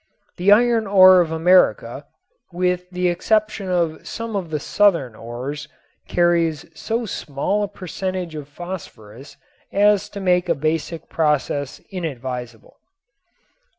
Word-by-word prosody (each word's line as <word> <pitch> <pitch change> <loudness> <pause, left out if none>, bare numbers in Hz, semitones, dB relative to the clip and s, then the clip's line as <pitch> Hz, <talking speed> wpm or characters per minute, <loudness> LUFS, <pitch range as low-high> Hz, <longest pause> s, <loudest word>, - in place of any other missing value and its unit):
The 185 +3 +3
iron 230 0 +4
ore 185 -2 +7
of 165 -2 -2
America, 180 +3 +2 0.4
with 180 0 -1
the 180 0 -1
exception 215 +2 0
of 170 -3 -1
some 230 -1 -5
of 185 -4 -3
the 155 -1 -2
southern 165 - +2
ores, 125 +7 -6 0.4
carries 170 -3 +1
so 230 +7 -3
small 175 +2 -2
a 205 - 0
percentage 185 -2 -5
of 150 -2 -7
phosphorus 140 - -10 0.3
as 205 0 +3
to 205 - -8
make 180 -2 +1
a 170 - +3
basic 155 +2 -2
process 150 -3 -1
inadvisable. 125 - -6
175 Hz, 120 wpm, -21 LUFS, 150-190 Hz, 0.4 s, ore